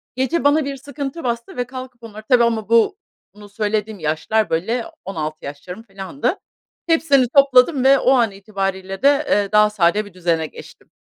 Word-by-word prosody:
Gece 265 +6 -1
bana 290 +1 +3
bir 280 -1 -5
sıkıntı 280 +3 -7
bastı 235 0 -4
ve 245 - 0
kalkıp 255 -1 -10
onları 215 -1 -10
tabii, 245 -2 +5
ama 225 -3 -1
bu 230 - +3 0.4
bunu 205 -1 -14
söylediğim 210 0 -2
yaşlar, 160 +8 -1
böyle, 225 +9 -1 0.2
16 155 -5 -5
yaşlarım, 180 +9 -9
filandı. 195 +5 -3 0.5
Hepsini 305 -5 +3
topladım 275 0 +5
ve 270 0 +5
o 260 - +2
an 235 -5 +3
itibariyle 195 -1 -5
de, 285 +1 +4
eee, 200 -1 +1
daha 210 0 +5
sade 205 +1 +1
bir 205 - -14
düzene 170 -3 -1
geçtim. - - -15
220 Hz, 170 wpm, -20 LUFS, 195-260 Hz, 0.5 s, tabii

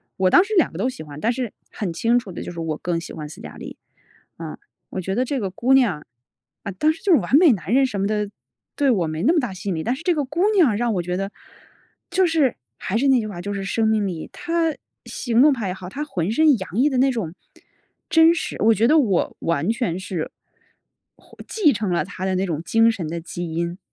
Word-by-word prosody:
我 185 -1 +2
当 360 - +7
时 430 +2 -4
2 350 - +4
个 - - -8
都 255 - +1
喜 250 - -8
欢， 145 -1 -10
但 230 - +2
是 245 -3 -4 0.2
很 185 -5 -4
清 230 +8 +2
楚 220 -6 -4
地 175 - -7
就 - - -6
是 170 - -8
我 165 -2 -2
更 175 -1 -1
喜 165 - -9
欢 150 -2 -7
斯 150 - -11
嘉 - - -10
丽。 - - -9 0.6
啊， 160 -2 -7 0.3
我 - - -5
觉 190 +1 -3
得 245 +5 +1
这 265 +1 -2
个 195 -4 -3
姑 250 +8 +2
娘 205 - +2 0.6
啊， 200 - -4
当 305 +12 +2
时 325 - -10
就 390 - +4
是 305 - +6
完 210 +8 +3
美 330 -2 +7
男 185 -5 -2
人 265 +2 +5
什 205 -6 -3
么 200 - +1
的， 210 0 -1 0.5
对 285 -1 +2
我 195 -9 +2
没 155 0 -4
那 265 - +4
么 340 - +3
大 245 -8 -3
吸 190 +2 -6
引 185 - -1
力， 160 - -3
但 240 +3 0
是 275 - -10
这 350 0 +1
个 295 -2 -1
姑 295 +6 -3
娘 305 - +4
让 235 -1 0
我 180 - -1
觉 180 +1 -2
得 195 +2 -3 0.8
就 370 +1 +3
是 315 -7 +2 0.2
还 200 - -2
是 275 +4 +2
那 265 -2 +5
句 215 - -3
话， 195 -5 -7
就 205 +3 -4
是 200 -1 -4
生 220 +3 0
命 215 -2 +1
力。 170 -4 -5
她 335 -2 0 0.3
行 240 0 +1
动 300 0 +6
派 230 -6 -3
也 180 - -2
好， 185 -1 -9
她 285 +10 -4
浑 185 - -2
身 300 +2 +4
洋 190 - -7
溢 285 +4 +4
的 265 - -1
那 265 +1 +4
种 190 -9 -4 0.7
真 325 0 +6
实 340 - -4
我 225 +2 +5
觉 225 +2 +2
得 310 - +5
我 205 - +1
完 165 -1 -1
全 230 -7 -2
是， 185 -4 -4 0.9
获 - - -21
继 350 -10 +3
承 210 -5 -2
了 175 - +1
她 190 -1 -8
的 190 0 0
那 185 +1 0
种 160 -4 -3
精 225 +6 +4
神 185 -8 -5
的 170 +2 -4
基 175 0 -6
因。 170 +1 -2
215 Hz, 275 characters per minute, -22 LUFS, 180-270 Hz, 0.9 s, 当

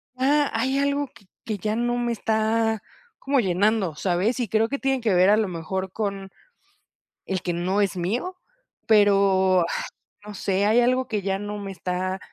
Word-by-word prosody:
Ah, 285 +3 +2
hay 260 +4 0
algo 280 0 0
que 215 -8 -19 0.2
que 215 -2 -3
ya 210 +3 -2
no 240 +1 0
me 240 -1 -1
está 220 0 0 0.4
como 275 -1 +1
llenando, 195 -2 +1
¿sabes? 195 +8 0
Y 240 - -1
creo 220 +2 +1
que 280 - -3
tiene 270 -1 0
que 220 -4 +1
ver 180 +2 +5
a 210 - +6
lo 215 -3 0
mejor 185 +3 -4
con 195 -2 -4 1.0
el 190 -2 -2
que 175 - -2
no 185 +4 0
es 195 -2 0
mío, 235 - -2 0.5
pero, 195 -3 +4
ah, - - +1 0.6
no 210 - -8
sé, 195 0 0
hay 220 +3 +4
algo 255 +1 +2
que 215 -4 -2
ya 195 0 -1
no 205 +1 -5
me 200 -1 -6
está 185 0 -3
210 Hz, 185 wpm, -24 LUFS, 190-240 Hz, 1.0 s, a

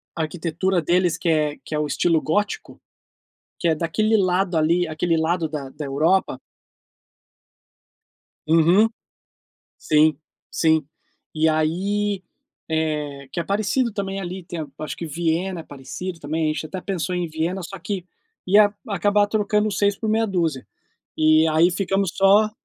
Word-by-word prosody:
a 165 - -2
arquitetura 170 +3 -1
deles 175 +1 +2
que 170 - -1
é 150 -2 +1
que 155 - -5
é 150 - 0
o 150 - 0
estilo 165 +2 +2
gótico 205 +6 -2 0.8
que 170 - 0
é 160 - +3
daquele 215 +8 +1
lado 185 -2 +1
ali, 170 +2 +2
aquele 165 +1 0
lado 160 0 0
da 145 -3 -5
da 145 +2 -7
Europa. 160 +8 +1 2.1
Uhum. 175 +7 +5 0.9
Sim, 155 -1 +3 0.3
sim 160 -3 +2 0.5
e 155 0 +2
aí, 190 +6 0 0.5
eh, 150 -3 -2
que - - -3
é 170 - -1
parecido 215 +3 0
também 195 -1 -3
ali, 185 0 -6
tem 170 -1 -6
a 150 - -4 0.2
acho 155 - -5
que 170 - -5
Viena 170 +3 -1
é - - -14
parecido 155 +6 -7
também, 155 +1 -1
a - - 0
gente 155 - -4
até 180 +4 -6
pensou 185 -2 -2
em 180 - -1
Viena, 165 +4 -2
só 195 +2 -8
que 180 +1 -4 0.4
ia 205 +2 +5 0.2
acabar 205 +1 +2
trocando 210 0 +1
seis 200 0 +1
por 220 - -2
meia 225 +1 +2
dúzia, 165 - -1 0.5
e 155 0 +5
aí 160 +3 +4
ficamos 195 -1 0
só. 200 +2 +5
170 Hz, 155 wpm, -22 LUFS, 155-195 Hz, 2.1 s, Uhum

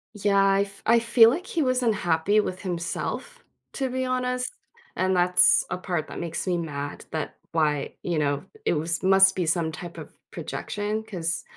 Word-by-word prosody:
Yeah, 200 -1 +1
I 195 0 +4
f 195 -1 -5
I 235 +1 +5
feel, 230 0 +6
like, 345 +8 -4
he 330 - -1
was 255 -1 +1
unhappy 200 -3 +2
with 185 -3 -2
himself, 185 - -4 0.3
to 265 -1 -2
be 260 +1 -2
honest, 250 0 -1 0.4
and 185 0 +1
that's 180 0 +4
a - - -1
part 175 -4 -3
that - - -7
makes 165 -2 -4
me 180 -2 0
mad 145 -4 -5
that 155 -2 -4 0.2
why, 150 -3 0
you 170 -3 -1
know, 145 -1 0 0.2
it - - +2
was 165 +1 -1
must 190 0 +5
be 180 - 0
some 165 -1 +1
type 170 +2 -9
of - - -8 0.2
projection 210 +1 -4
'cause 175 -5 -3
185 Hz, 180 wpm, -25 LUFS, 165-220 Hz, 0.4 s, feel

